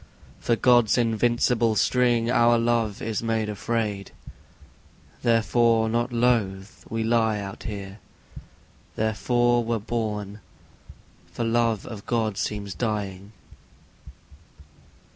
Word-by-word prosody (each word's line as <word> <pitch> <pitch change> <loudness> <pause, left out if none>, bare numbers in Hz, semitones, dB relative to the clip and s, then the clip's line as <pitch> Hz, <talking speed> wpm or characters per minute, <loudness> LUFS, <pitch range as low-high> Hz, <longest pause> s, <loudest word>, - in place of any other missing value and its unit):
For 120 - +1
God's 120 -2 +4
invincible 115 0 +1
spring 120 +2 +2
our 120 -1 +4
love 115 -3 0
is 110 -2 -2
made 110 -2 -1
afraid; 105 -2 -3 1.1
Therefore, 115 -1 +2
not 120 +2 -1
loath, 110 -5 0
we 115 0 -2
lie 110 -2 +1
out 100 -1 -7
here; 100 -1 -7 1.0
therefore 120 +2 +1
were 115 0 -1
born, 105 -2 -4 0.9
For 120 - -4
love 115 -2 +1
of 105 -3 -9
God 110 -4 0
seems 100 -1 -3
dying. 100 -3 -4
115 Hz, 100 wpm, -25 LUFS, 105-120 Hz, 1.1 s, God's